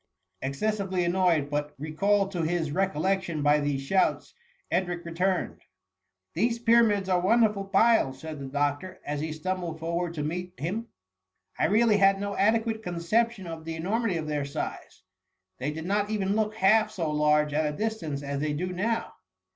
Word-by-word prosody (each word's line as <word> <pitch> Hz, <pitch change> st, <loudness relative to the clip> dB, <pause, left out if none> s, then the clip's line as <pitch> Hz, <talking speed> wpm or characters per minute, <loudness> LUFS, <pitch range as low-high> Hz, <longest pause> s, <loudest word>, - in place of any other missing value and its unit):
Excessively 190 Hz, +6 st, -1 dB
annoyed, 170 Hz, -5 st, +2 dB
but 145 Hz, 0 st, -2 dB
recalled 195 Hz, +7 st, +1 dB
to 175 Hz, -3 st, -2 dB
his 160 Hz, -2 st, -1 dB
re 190 Hz, +5 st, +2 dB
collection 175 Hz, -2 st, -1 dB
by 145 Hz, +1 st, +4 dB
these 145 Hz, -2 st, -1 dB
shouts, 185 Hz, +7 st, +1 dB, 0.4 s
Edric 175 Hz, -2 st, -1 dB
returned. 180 Hz, +2 st, -1 dB, 0.4 s
" 95 Hz, 0 st, -56 dB
These 235 Hz, 0 st, +1 dB
Pyramids 230 Hz, -4 st, +3 dB
are 185 Hz, -1 st, +2 dB
wonderful 210 Hz, +1 st, +3 dB
piles,"' 200 Hz, -, +3 dB
said 155 Hz, -1 st, -7 dB
the 135 Hz, -, -6 dB
doctor, 145 Hz, +6 st, -2 dB
as 145 Hz, 0 st, -3 dB
he 160 Hz, 0 st, -3 dB
stumbled 170 Hz, +1 st, -3 dB
forward 170 Hz, +1 st, -2 dB
to 150 Hz, -, -2 dB
meet 180 Hz, +4 st, -4 dB
him. 205 Hz, +10 st, -3 dB, 0.3 s
" 95 Hz, 0 st, -33 dB
I -, -, +3 dB
really 215 Hz, +4 st, +4 dB
had 195 Hz, 0 st, +4 dB
no 200 Hz, 0 st, -3 dB
adequate 220 Hz, +2 st, +1 dB
conception 195 Hz, +4 st, 0 dB
of 165 Hz, -1 st, -7 dB
the 165 Hz, 0 st, -5 dB
enormity 195 Hz, +3 st, -1 dB
of 160 Hz, -, -3 dB
their 150 Hz, -1 st, -1 dB
size. 140 Hz, -, -6 dB, 0.6 s
They 130 Hz, +3 st, -2 dB
did 160 Hz, +2 st, -5 dB
not 205 Hz, +2 st, 0 dB
even 200 Hz, -2 st, 0 dB
look 215 Hz, 0 st, 0 dB
half 215 Hz, +3 st, +4 dB
so 165 Hz, -4 st, -2 dB
large 150 Hz, 0 st, +2 dB
at 150 Hz, 0 st, +1 dB
a 150 Hz, -, -9 dB
distance 170 Hz, -11 st, -3 dB
as 140 Hz, 0 st, -3 dB
they 150 Hz, 0 st, -1 dB
do 180 Hz, +5 st, -3 dB
now.'" 225 Hz, +5 st, -1 dB
175 Hz, 175 wpm, -27 LUFS, 150-200 Hz, 0.6 s, by